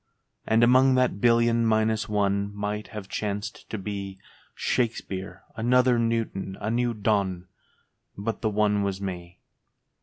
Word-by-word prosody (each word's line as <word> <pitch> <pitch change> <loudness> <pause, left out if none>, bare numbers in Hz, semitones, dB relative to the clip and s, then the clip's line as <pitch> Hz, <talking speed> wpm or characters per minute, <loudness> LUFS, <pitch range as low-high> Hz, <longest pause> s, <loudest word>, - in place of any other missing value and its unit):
And 110 +1 +4
among 130 +2 +5
that 125 -6 +1
billion 115 -1 +4
minus 110 0 +1
one 100 -1 0
Might 105 +1 -3
have 105 -3 -8
chanced 105 0 -4
to 110 - -4
be 100 -1 -5 0.4
Shakespeare, 100 -5 -2
another 125 +1 +3
Newton, 115 -4 -2
a 110 +2 -2
new 120 0 0
Donne 100 -4 0 0.4
— - - -46 0.3
But 110 +3 -3
the 110 - +1
One 105 -1 +2
was 100 -1 -2
Me. 90 -3 -6
105 Hz, 140 wpm, -26 LUFS, 100-115 Hz, 0.4 s, among